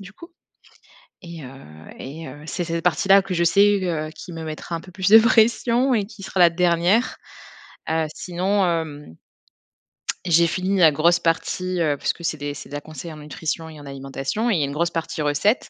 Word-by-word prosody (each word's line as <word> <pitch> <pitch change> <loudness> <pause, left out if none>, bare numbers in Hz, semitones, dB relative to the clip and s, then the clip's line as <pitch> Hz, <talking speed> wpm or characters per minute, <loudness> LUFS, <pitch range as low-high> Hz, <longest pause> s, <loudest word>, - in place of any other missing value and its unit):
du 195 +1 -11
coup. 335 - -14 0.9
Et, 170 -4 -9
heu - - -8 0.5
et, 160 +5 -8
heu, 145 +3 -11
c'est 175 - -3
cette 165 0 -3
partie 175 +2 +1
là 195 0 +7
que 190 -1 -4
je 170 - +1
sais 200 +4 +4
que 160 -4 -2
qui 175 - -10
me 165 -1 -6
mettra 155 +2 -6
un 165 - -3
peu 185 - -14
plus 190 0 0
de 220 - +11
pression 235 +2 +3
et 210 -3 +1
qui 210 -2 -13
sera 190 - -2
la 175 - +7
dernière. 175 +6 +2 0.7
Heu, 160 0 +1
sinon, 190 +3 0
hem, 155 - -3 1.1
j'ai 170 -1 +4
fini 190 +3 -1
la 165 -3 +7
grosse 170 +4 +3
partie, 180 +2 -1
heu, 150 -3 +1
parce - - -1
que 170 - -14
c'est 160 -2 -1
des 145 0 -4
c'est 145 - -10
de 145 - -7
la 145 - -4
conseil 160 +2 -9
en - - -11
nutrition 155 +2 -5
et 155 -1 -12
en 145 - -12
alimentation 135 - -3
et 205 - +2
il - - +1
y - - +1
a - - +1
une 140 - -5
grosse 170 +3 0
partie 165 -2 -3
recettes. 150 - +1
170 Hz, 220 wpm, -22 LUFS, 155-190 Hz, 1.1 s, de